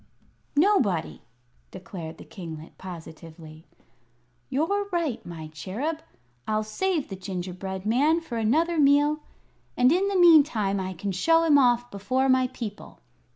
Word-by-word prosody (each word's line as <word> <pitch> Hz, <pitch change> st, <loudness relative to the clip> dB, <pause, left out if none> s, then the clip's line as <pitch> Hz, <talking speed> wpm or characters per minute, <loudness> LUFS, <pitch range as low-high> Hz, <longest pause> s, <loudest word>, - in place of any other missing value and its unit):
"Nobody," 275 Hz, -, +2 dB, 0.5 s
declared 175 Hz, -3 st, -8 dB
the -, -, -11 dB
kinglet, 160 Hz, -4 st, -9 dB
positively. 160 Hz, -2 st, -11 dB, 0.8 s
"You're 400 Hz, +9 st, 0 dB
right, 305 Hz, -10 st, -1 dB
my 160 Hz, -2 st, -8 dB
Cherub; 240 Hz, -, -4 dB, 0.5 s
I'll 215 Hz, 0 st, 0 dB
save 315 Hz, -, -1 dB
the 195 Hz, -, -5 dB
gingerbread 185 Hz, 0 st, -6 dB
man 285 Hz, +9 st, +3 dB
for 240 Hz, -9 st, -5 dB
another 320 Hz, +10 st, +1 dB
meal, 290 Hz, +1 st, +4 dB, 0.6 s
and 250 Hz, +2 st, +5 dB
in 370 Hz, +4 st, +2 dB
the 400 Hz, -1 st, 0 dB
meantime 285 Hz, -, +5 dB
I 190 Hz, 0 st, -4 dB
can 195 Hz, +3 st, -4 dB
show 330 Hz, -, +3 dB
him 300 Hz, -3 st, +5 dB
off 245 Hz, -2 st, +2 dB
before 255 Hz, +7 st, 0 dB
my 255 Hz, 0 st, +4 dB
people. 230 Hz, -5 st, -8 dB
230 Hz, 130 wpm, -26 LUFS, 185-305 Hz, 0.8 s, and